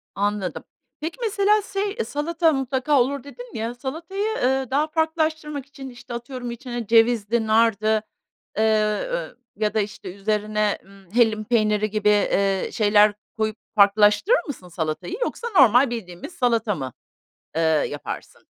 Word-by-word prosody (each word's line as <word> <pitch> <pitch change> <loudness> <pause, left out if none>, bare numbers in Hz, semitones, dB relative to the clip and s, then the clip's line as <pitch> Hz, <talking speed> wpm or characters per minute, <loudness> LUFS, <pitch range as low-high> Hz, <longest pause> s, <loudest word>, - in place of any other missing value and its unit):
Anladım. 205 -2 -2 0.4
Peki 320 +2 -4
mesela, 420 -1 +2
şey, 400 +1 -3
salata 325 +3 +1
mutlaka 270 +1 +1
olur, 275 +1 -1
dedin 485 +12 -11
ya, 225 +2 -3
salatayı, 335 - -3
ııı, 265 0 +1
daha 295 +3 +2
farklılaştırmak 315 -2 -1
için, 275 -1 -10
işte, 245 -1 -10
atıyorum 245 0 -6
içine 240 -2 -6
cevizdi, 225 -1 +3
nardı, 220 -1 +3 0.6
eee, 220 - +3 0.5
ııı, - - -4 0.2
ya 210 0 -1
da, 220 - +1
işte, 200 -3 -5
üzerine, 210 0 0
ımm, 195 -2 -19
hellim 220 -2 +3
peyniri 215 -2 +1
gibi, 210 0 +1
eee, 195 -2 +2
şeyler 210 -1 +4 0.2
koyup 220 0 -1 0.2
farklılaştırır 210 - +5
mısın 220 -10 -7
salatayı? 165 0 -3
Yoksa 475 -1 -2
normal 255 - +6
bildiğimiz 195 - -7
salata 230 -5 +1
mı, 130 -5 -5 0.6
eee, 165 - +2 0.3
yaparsın? 145 - -7
235 Hz, 135 wpm, -23 LUFS, 210-285 Hz, 0.6 s, normal